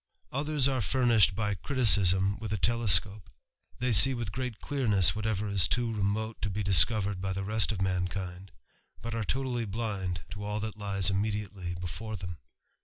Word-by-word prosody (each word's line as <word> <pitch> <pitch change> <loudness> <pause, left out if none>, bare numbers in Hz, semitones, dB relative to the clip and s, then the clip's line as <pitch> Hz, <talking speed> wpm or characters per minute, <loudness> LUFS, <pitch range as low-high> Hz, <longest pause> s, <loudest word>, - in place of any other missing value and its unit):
Others 145 0 0
are 130 -3 -1
furnished 115 -4 +2
by 105 -1 -1
criticism 100 -4 +2
with 110 -1 -6
a 105 - -1
telescope 105 -3 +2 0.2
* - - -34
They 125 0 -1
see 130 +6 +8
with 115 -5 -5
great 125 0 -5
clearness 105 - +1
whatever 105 -1 -2
is 100 -5 +2
too 120 +1 -1
remote 110 +2 -3
be 105 +2 -3
discovered 100 0 +4
by 95 0 -3
the 95 +1 -4
rest 110 +2 0
of 95 -3 -3
mankind, 90 0 -4 0.5
but 115 0 -5
are 115 -1 -2
totally 125 0 -2
blinc 100 -5 -4
to 100 +3 -7
all 105 +1 -3
that 110 0 -5
lies 100 -1 0
immediately 100 -3 -3
before 90 +5 -6
them. 90 -3 -8
105 Hz, 170 wpm, -28 LUFS, 95-115 Hz, 0.5 s, see